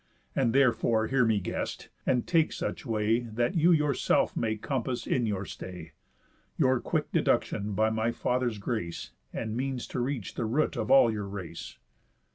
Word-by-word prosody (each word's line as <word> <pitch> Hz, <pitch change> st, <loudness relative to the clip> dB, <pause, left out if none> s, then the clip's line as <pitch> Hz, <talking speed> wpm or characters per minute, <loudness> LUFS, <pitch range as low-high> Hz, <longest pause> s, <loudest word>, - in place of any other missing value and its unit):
And 125 Hz, -4 st, +2 dB
therefore 115 Hz, -3 st, +3 dB
hear 130 Hz, -1 st, +3 dB
me, 110 Hz, -2 st, +2 dB
guest, 90 Hz, -, -4 dB, 0.2 s
and 125 Hz, -2 st, +2 dB
take 165 Hz, -3 st, +3 dB
such -, -, -4 dB
way, 110 Hz, 0 st, +2 dB
That 120 Hz, -, -1 dB
you 170 Hz, 0 st, +4 dB
yourself 150 Hz, -4 st, +2 dB
may 110 Hz, -1 st, 0 dB
compass, 125 Hz, +2 st, -3 dB
in 120 Hz, -3 st, +1 dB
your 100 Hz, -2 st, -2 dB
stay, 90 Hz, -4 st, -8 dB, 0.7 s
Your 130 Hz, -4 st, +3 dB
quick -, -, -2 dB
deduction 105 Hz, 0 st, +1 dB
by 110 Hz, +2 st, +2 dB
my 110 Hz, +1 st, 0 dB
father's 125 Hz, -1 st, -1 dB
grace, 95 Hz, -, -4 dB, 0.2 s
And 110 Hz, -1 st, -4 dB
means 130 Hz, 0 st, -2 dB
to -, -, -3 dB
reach 125 Hz, -4 st, -2 dB
the 120 Hz, -, -2 dB
root 140 Hz, +7 st, +1 dB
of 110 Hz, -3 st, -2 dB
all 135 Hz, -4 st, +7 dB
your 105 Hz, -2 st, -4 dB
race. 95 Hz, -4 st, -7 dB
115 Hz, 165 wpm, -29 LUFS, 110-130 Hz, 0.7 s, all